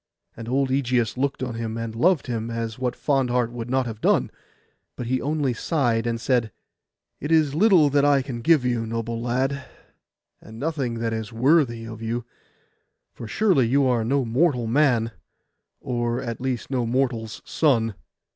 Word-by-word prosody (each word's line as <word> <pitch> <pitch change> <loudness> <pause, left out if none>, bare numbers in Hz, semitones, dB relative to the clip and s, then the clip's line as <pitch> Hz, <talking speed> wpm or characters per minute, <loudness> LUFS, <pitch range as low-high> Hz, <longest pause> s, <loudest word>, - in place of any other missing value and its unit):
And 115 0 -8
old 135 +1 +1
Ægeus 125 -4 +1
looked 135 +1 -1
on 125 -2 -3
him, 115 0 -4
and 115 -1 -4
loved 165 +8 +2
him, 115 -2 -3
as 115 0 -4
what 125 -1 -1
fond 135 -3 +1
heart 120 -1 +1
would 120 0 -6
not 130 0 +1
have 110 -2 -7
done? - - +2 0.6
But 125 - -5
he 130 +2 0
only 145 -3 0
sighed, 120 -4 0
and 115 0 -1
said— 120 -3 +1 0.7
'It 150 - -4
is 155 -3 +3
little 180 -2 +5
that 145 0 +3
I 140 -2 +4
can 125 -3 -6
give 150 -1 +4
you, 120 -2 0
noble 115 0 -3
lad, 130 +3 -1 0.8
and 110 - -12
nothing 140 -6 -2
that 115 0 -2
is 110 +1 -4
worthy 120 -1 +2
of 115 -1 -8
you; 115 +1 -3 0.9
for 115 - -8
surely 180 - +2
you 135 +3 +3
are 125 -3 +2
no 135 +3 +1
mortal 125 +1 +1
man, 120 -2 +2 0.7
or 120 -1 -2
at 115 0 -5
least 130 -1 -3
no 125 -3 0
mortal's 120 -3 -1
son. 115 -8 +1
125 Hz, 175 wpm, -24 LUFS, 115-140 Hz, 0.9 s, little